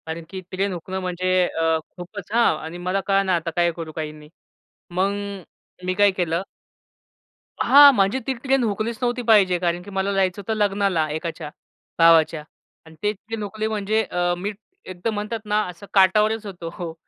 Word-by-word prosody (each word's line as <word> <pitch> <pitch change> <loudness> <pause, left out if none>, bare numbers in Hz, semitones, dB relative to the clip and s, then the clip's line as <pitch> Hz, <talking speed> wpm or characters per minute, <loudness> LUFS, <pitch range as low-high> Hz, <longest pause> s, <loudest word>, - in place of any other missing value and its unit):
कारण, 165 +1 -5
की 190 - -6
ट्रेन 195 +1 -1
हुकणं 185 +2 -5
म्हणजे 180 0 -3 0.2
अ, 165 0 +1 0.2
खूपच 190 +4 -9
हां, 235 -7 +4
आणि 160 +2 -7
मला 195 +2 +1
कळेना 195 -2 +2
आता 170 0 -2
काय 175 -1 +3
करू, 165 -1 -7
काही 155 -1 -5
नाही. 150 0 -14 0.6
मग 185 +3 +1 0.7
मी 185 - 0
काय 205 +1 +4
केलं 175 -1 -1 1.2
हां, 285 +1 +8
म्हणजे 200 +5 +2
ती 265 - +1
ट्रेन 265 +1 0
हुकलीच 220 +1 -2
नव्हती 245 0 0
पाहिजे 205 -6 +4
कारण, 175 0 -1
की 205 - -11
मला 195 +1 -1
जायचं 190 0 0
होतं 210 +3 -3
लग्नाला 195 -5 +1
एकाच्या, 160 -1 -5 0.5
भावाच्या 165 -2 +5 0.4
आणि 160 0 -15
ते 210 - +2
ट्रेन 215 +1 -7
हुकली 215 +2 -3
म्हणजे 215 0 0
अ, 175 -2 -1
मी 200 +4 -3 0.3
एकदम 185 +4 -4
म्हणतात 210 +2 -3
ना 210 0 +1
असं 180 +3 -11
काठावरच 210 +3 +3
होतो. 175 -3 -7
190 Hz, 170 wpm, -22 LUFS, 170-210 Hz, 1.2 s, हां